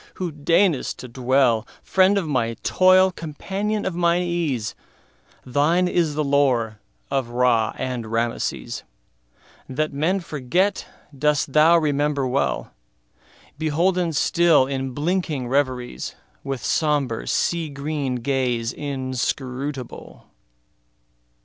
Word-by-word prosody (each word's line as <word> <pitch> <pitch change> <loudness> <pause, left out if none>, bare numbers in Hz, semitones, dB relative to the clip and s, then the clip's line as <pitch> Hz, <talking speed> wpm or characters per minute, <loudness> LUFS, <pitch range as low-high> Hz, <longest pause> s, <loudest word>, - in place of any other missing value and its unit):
who 180 -3 -3
deign'st 160 +2 +1
to 125 - -8
dwellFriend 130 - +2
of 185 -5 -1
my 120 -5 0
toil, 185 0 +5
companion 195 +6 -3
of 190 - -1
mine 170 +1 +2
ease, 160 -11 -1 0.7
Thine 155 +8 +2
is 165 -4 +1
the 155 - 0
lore 130 -7 +1 0.3
of 135 -3 0
Ra 120 -2 +2
and 125 -3 -3
Rameses; 115 +1 -2 0.9
That 150 +3 -1
men 165 +7 +1
forget 175 +5 -1 0.3
dost 150 0 +1
thou 160 +3 +6
remember 145 -2 +1
well, 130 +2 -1 0.9
Beholden 170 +3 +1
still 165 -1 +4
in 135 0 -3
blinking 160 -3 -1
reveriesWith 130 - -3
sombre, 145 -7 0
sea 170 -2 0
green 140 -2 -3
gaze 125 -2 -1
inscrutable. 130 -1 -4
145 Hz, 100 wpm, -23 LUFS, 130-170 Hz, 0.9 s, thou